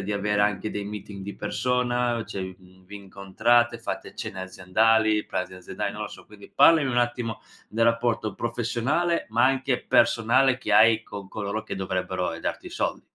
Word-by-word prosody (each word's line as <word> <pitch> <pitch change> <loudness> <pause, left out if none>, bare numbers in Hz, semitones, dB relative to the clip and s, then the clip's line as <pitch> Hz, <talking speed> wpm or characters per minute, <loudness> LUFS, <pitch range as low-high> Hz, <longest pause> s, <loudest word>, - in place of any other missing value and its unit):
di 105 +2 -3
avere 105 0 +1
anche 105 +1 0
dei 105 -1 -4
meeting 100 -1 -7
di 100 +1 -6
persona? 125 -1 0
Cioè, 95 - -5
n 95 0 -11
vi 105 +2 -10
incontrate, 110 +5 +1
fate - - -6
cene 95 - -6
aziendali, 105 +4 +2
pranzi 90 0 -4
aziendali? 90 -1 -5
Non - - -6
lo - - -4
so, - - -13
quindi 105 -1 -15
parlami 155 -5 +6
un 120 - +1
attimo 120 -2 -1 0.3
del 115 +1 +1
rapporto 115 -2 0
professionale, 120 +9 -1
ma 115 +2 +3
anche 130 -1 +1
personale, 125 +3 +3
che 110 - -5
hai 110 +1 +6
con 100 -3 -9
coloro 105 +1 -4
che 110 - -6
dovrebbero, 95 -1 -2
ehm, - - -8
darti - - -4
i - - -8
soldi. - - -2
110 Hz, 180 wpm, -25 LUFS, 100-120 Hz, 0.3 s, parlami